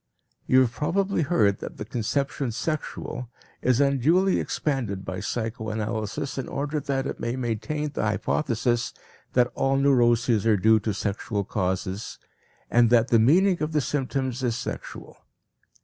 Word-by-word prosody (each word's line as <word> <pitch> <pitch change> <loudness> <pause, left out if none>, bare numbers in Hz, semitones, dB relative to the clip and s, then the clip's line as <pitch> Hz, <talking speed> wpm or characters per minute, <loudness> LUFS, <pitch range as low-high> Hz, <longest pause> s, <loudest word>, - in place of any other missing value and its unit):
You 130 0 +6
have 125 -3 +2
probably 190 +8 0
heard 110 - +2
that - - -7
the 105 - -5
conception 130 +3 -2
"sexual" 125 -2 -4 0.3
is 125 0 +2
unduly 150 +8 +3
expanded 115 -10 -2
by 95 0 -4
psychoanalysis 110 +2 -3
in 130 - -4
order 145 +2 -2
that 135 -1 -2
it - - -4
may 115 +1 -2
maintain 130 +5 -2
the - - -3
hypothesis 115 +2 0 0.4
that 125 -1 +3
all 135 0 +1
neuroses 120 -5 +3
are 110 -2 +4
due 110 +3 +5
to 105 -1 -2
sexual 100 0 -2
causes 95 +1 -3 0.5
and 120 -1 +5
that 120 0 +4
the 115 - +5
meaning 175 - +4
of 155 +1 -2
the 150 - +2
symptoms 130 -2 -2
is 120 -2 0
sexual. 120 - -7
120 Hz, 145 wpm, -25 LUFS, 110-140 Hz, 0.5 s, You